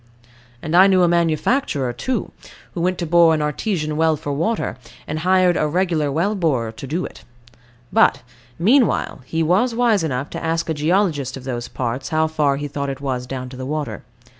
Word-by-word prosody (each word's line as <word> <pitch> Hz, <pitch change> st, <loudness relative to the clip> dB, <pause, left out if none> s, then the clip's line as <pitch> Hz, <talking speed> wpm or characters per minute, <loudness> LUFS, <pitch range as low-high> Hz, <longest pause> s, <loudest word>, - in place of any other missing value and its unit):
And 155 Hz, +2 st, -1 dB
I 190 Hz, +2 st, +8 dB
knew 185 Hz, -2 st, +4 dB
a -, -, +5 dB
manufacturer, 165 Hz, -, +1 dB
too, 255 Hz, -, -3 dB, 0.4 s
who 175 Hz, -, -3 dB
went 180 Hz, +1 st, 0 dB
to 170 Hz, -, -3 dB
bore 165 Hz, 0 st, +5 dB
an 155 Hz, -, -2 dB
Artesian 155 Hz, 0 st, -2 dB
well 160 Hz, 0 st, +2 dB
for 145 Hz, 0 st, -4 dB
water, 170 Hz, -, -1 dB, 0.3 s
and 155 Hz, +1 st, -4 dB
hired 185 Hz, +1 st, +3 dB
a 155 Hz, -, +1 dB
regular 165 Hz, -3 st, 0 dB
well 170 Hz, +9 st, 0 dB
borer 140 Hz, -, 0 dB
to 125 Hz, +4 st, -9 dB
do 165 Hz, +7 st, -2 dB
it. -, -, -11 dB, 0.7 s
But, -, -, +4 dB, 0.3 s
meanwhile 230 Hz, -, +2 dB
he 165 Hz, +4 st, -1 dB
was 200 Hz, +9 st, +2 dB
wise 230 Hz, -6 st, +2 dB
enough 140 Hz, -2 st, -3 dB
to -, -, -6 dB
ask 165 Hz, 0 st, -1 dB
a -, -, +1 dB
geologist 150 Hz, -4 st, 0 dB
of 130 Hz, -, -10 dB
those 120 Hz, -2 st, -4 dB
parts 125 Hz, +1 st, -4 dB
how 160 Hz, -1 st, +2 dB
far 150 Hz, -3 st, +1 dB
he 145 Hz, +1 st, -4 dB
thought 140 Hz, 0 st, -4 dB
it 135 Hz, -, -5 dB
was 130 Hz, -3 st, -3 dB
down 130 Hz, -1 st, -5 dB
to 130 Hz, -, -10 dB
the 130 Hz, -, -5 dB
water. 150 Hz, 0 st, -3 dB
160 Hz, 195 wpm, -20 LUFS, 140-180 Hz, 0.7 s, I